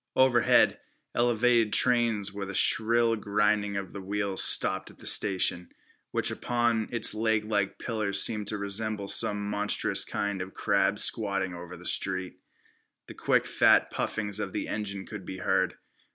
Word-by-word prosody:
Overhead 130 -3 +3 0.3
elevated 120 -2 +1
trains 115 -5 +1
with 100 -1 -7
a 100 - -7
shrill 115 +1 +2
grinding 105 -1 -1
of 100 -2 -7
the 100 - -8
wheels 100 0 -1
stopped - - +3
at - - -18
the - - -15
station, 90 -3 +3 0.4
which - - 0
upon 120 -2 -2
its 115 -3 +2
leglike 110 -2 -2
pillars 105 -4 -1
seemed 105 -1 +4
to 105 - -3
resemble 100 +1 -3
some 105 +1 +4
monstrous 105 0 0
kind 100 -2 -4
of 95 +1 -9
crab 100 0 0
squatting 100 -5 -1
over 90 +1 -10
the 90 - -15
street. 95 -1 -2 0.7
The - - -12
quick - - 0
fat - - +2
puffings 105 -2 -3
of 95 -3 -5
the - - -4
engines 100 -2 -5
could 105 -3 -9
be 95 - -8
heard. - - -1
105 Hz, 150 wpm, -26 LUFS, 100-110 Hz, 0.7 s, seemed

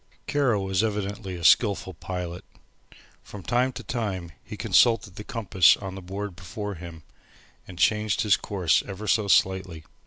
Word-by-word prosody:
Kara 140 -7 +1
was 95 +1 0
evidently 100 -2 -3
a 85 - -8
skilful 100 0 +3
pilot. 90 +1 -6 0.8
From 100 -3 -11
time 125 +7 +1
to 125 - -8
time 100 -9 -4
he - - -9
consulted 115 -5 +3
the 105 - -8
compass 100 - +3
on 95 -2 -7
the 95 - -8
board 95 +1 -6
before 100 +2 -6
him, 85 -2 -10 0.6
and 90 - -11
changed 105 +5 +2
his 105 -4 +4
course 90 -5 +1
ever 100 +1 -7
so 105 0 +2
slightly. 95 -3 +1
95 Hz, 155 wpm, -25 LUFS, 90-105 Hz, 0.8 s, his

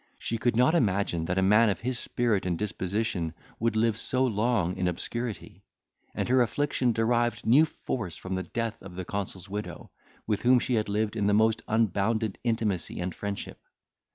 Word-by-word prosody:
She 115 - -3
could 120 0 +1
not 125 +6 +4
imagine 100 - +1
that 90 +2 -1
a 95 - +3
man 105 +4 +5
of 100 - -2
his 125 0 -2
spirit 115 -5 0
and 85 -2 0
disposition 95 -3 -2 0.2
would 115 -1 0
live 110 0 +2
so 130 +2 +1
long 105 -5 +1
in 90 -1 -1
obscurity. 115 +6 -4 0.5
And - - -1
her 130 +1 +4
affliction 125 +2 +1
derived 120 +1 +1
new 135 +8 +6
force 105 - -5
from 95 - -6
the 95 - -1
death 115 +5 -4
of 90 -2 -10
the 90 0 -5
consul's 95 -1 -4
widow, 105 +2 -6 0.3
with 105 -2 -1
whom 125 +1 +5
she 125 +1 0
had 110 -3 +1
lived 105 +1 0
in 105 -2 0
the 105 - +4
most 110 +1 +3
unbounded 110 0 +1
intimacy 110 -6 -1
and 90 0 -3
friendship. 100 +3 -5
110 Hz, 180 wpm, -28 LUFS, 95-120 Hz, 0.5 s, new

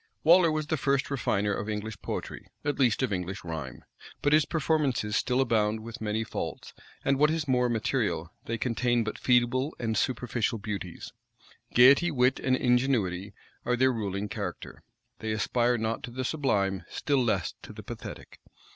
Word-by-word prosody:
Waller 170 0 +6
was 155 -1 -1
the 155 +1 -1
first 140 +1 0
refiner 105 -6 0
of 105 - -3
English 105 -1 -4
poetry, - - -5 0.2
at 145 -1 -1
least 125 -2 +3
of 120 -6 0
English 95 +1 -4
rhyme; 80 -6 -6 0.4
but 145 - +3
his 155 -1 +5
performances 145 -10 0
still 125 +4 +1
abound 110 -4 +1
with 115 +2 -9
many 110 +1 -1
faults, - - -5 0.3
and, 135 0 +2
what 150 +1 +5
is 160 -1 -1
more 125 -2 +2
material, 100 -6 -1
they 115 - -2
contain 120 0 +1
but 105 - -5
feeble 130 +3 +2
and 115 -2 -1
superficial 120 -2 0
beauties. 100 -4 -6 0.6
Gayety, 140 +8 +7
wit, 130 -3 +2
and 130 -1 +2
ingenuity 115 -7 +1 0.3
are 125 +1 +1
their 130 +1 +3
ruling 100 -2 -3
character: - - -6 0.4
they 110 - -3
aspire 120 +3 +1
not 110 0 -2
to 135 - -6
the 130 +2 -4
sublime; 100 - 0
still 140 -3 0
less 120 - 0
to - - -10
the - - -10
pathetic. - - -9
120 Hz, 165 wpm, -28 LUFS, 105-135 Hz, 0.6 s, Gayety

